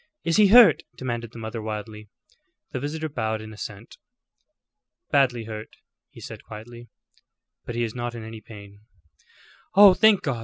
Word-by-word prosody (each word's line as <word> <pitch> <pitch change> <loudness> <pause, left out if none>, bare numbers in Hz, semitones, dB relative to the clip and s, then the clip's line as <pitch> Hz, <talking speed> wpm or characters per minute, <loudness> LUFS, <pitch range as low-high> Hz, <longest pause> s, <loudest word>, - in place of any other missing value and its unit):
"Is 165 - +1
he 210 -1 +6
hurt?" 235 +2 +7 0.2
demanded 120 -3 -4
the 120 - -12
mother, 110 0 -6
wildly. 105 -1 -7 0.6
The - - -3
visitor 155 +3 -4
bowed 110 -7 -3
in 110 0 -10
assent. 105 +1 -9 1.1
"Badly 130 -5 +2
hurt," 110 -1 -8 0.3
he - - -15
said, - - -10
quietly, 120 +2 -11 0.8
"but 120 - -6
he 120 - 0
is 115 -2 -3
not 120 -1 -5
in 115 - -7
any 110 0 -9
pain." 100 -2 -13 1.0
"Oh, 200 -1 +9
thank 220 0 +4
God!" 135 -8 -2
115 Hz, 155 wpm, -24 LUFS, 110-140 Hz, 1.1 s, Oh